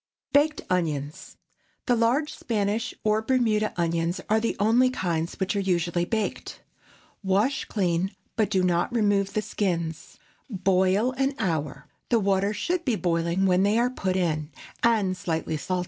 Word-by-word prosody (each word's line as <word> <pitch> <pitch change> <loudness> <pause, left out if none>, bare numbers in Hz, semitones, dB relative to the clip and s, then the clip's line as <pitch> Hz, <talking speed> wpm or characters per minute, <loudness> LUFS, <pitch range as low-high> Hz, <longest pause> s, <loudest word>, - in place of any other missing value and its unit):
BAKED 300 +2 +3
ONIONS. 150 -5 -2 0.5
The 245 - +3
large 245 +7 +1
Spanish 220 +1 -2
or 215 0 +2
Bermuda 220 -3 +1
onions 170 0 0
are 220 - +4
the 230 - -1
only 235 +5 +4
kinds 170 -8 -2
which 190 +1 -1
are - - +1
usually 175 -2 0
baked. 220 +2 -3 0.6
Wash 205 +7 +1
clean, 185 -3 0 0.3
but 215 -3 +1
do 190 -3 +1
not 175 +4 +1
remove 205 -4 +1
the 215 - 0
skins. 170 -7 -3 0.3
Boil 190 +3 +2
an 270 +1 0
hour—the 155 - -2
water 200 0 +1
should 345 +10 -2
be 250 -7 +1
boiling 170 0 0
when 185 -1 +3
they 205 +3 +3
are 245 +1 +2
put 190 -7 -2
in, 155 -5 -1 0.3
and 215 -5 +2
slightly 165 -4 -2
salt. 180 +4 -2
195 Hz, 145 wpm, -26 LUFS, 175-225 Hz, 0.6 s, are